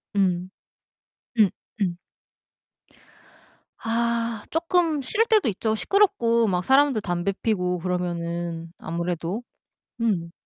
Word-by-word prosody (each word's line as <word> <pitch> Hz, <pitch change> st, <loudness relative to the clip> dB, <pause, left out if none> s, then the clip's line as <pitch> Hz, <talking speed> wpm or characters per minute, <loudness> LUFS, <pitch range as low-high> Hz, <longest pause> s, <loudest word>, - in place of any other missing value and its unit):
음. 185 Hz, -2 st, +1 dB, 0.9 s
응 210 Hz, -3 st, +7 dB, 0.3 s
응. 180 Hz, -3 st, +1 dB, 1.8 s
아 230 Hz, -1 st, -1 dB
쪼끔 330 Hz, -2 st, +1 dB
싫을 410 Hz, -, +2 dB
때도 430 Hz, -, +4 dB
있죠. 220 Hz, +2 st, -1 dB
시끄럽고 235 Hz, -, +3 dB
막 180 Hz, -2 st, 0 dB
사람들 270 Hz, -1 st, +4 dB
담배 175 Hz, +1 st, -1 dB
피우고 180 Hz, -5 st, 0 dB
그러면은 170 Hz, -2 st, -3 dB
아무래도 170 Hz, +5 st, -3 dB, 0.6 s
음. 190 Hz, -8 st, 0 dB
205 Hz, 195 characters per minute, -25 LUFS, 175-235 Hz, 1.8 s, 응